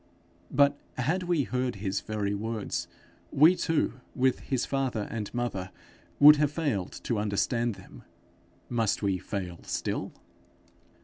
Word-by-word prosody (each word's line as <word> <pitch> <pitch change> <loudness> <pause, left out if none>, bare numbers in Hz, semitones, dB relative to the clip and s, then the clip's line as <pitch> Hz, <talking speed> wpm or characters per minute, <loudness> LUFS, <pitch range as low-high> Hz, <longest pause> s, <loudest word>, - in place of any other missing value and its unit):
But 140 +1 +3 0.2
had 155 +9 0
we 175 -5 +1
heard 125 -1 -1
his 95 -1 -2
very 105 -2 -2
words, 110 +1 -3 0.4
we 160 +6 +6
too, 165 -6 0 0.2
with 130 0 +2
his 130 -3 -1
father 130 -6 -1
and 110 -3 -4
mother, 120 -6 -3 0.5
would 150 +1 +10
have 150 -1 +2
failed 140 - -2
to 115 -4 -1
understand 110 +3 0
them. - - -14 0.7
Must 115 -3 0
we 95 -2 +1
fail 90 -4 -5
still? - - -3
120 Hz, 130 wpm, -28 LUFS, 105-140 Hz, 0.7 s, would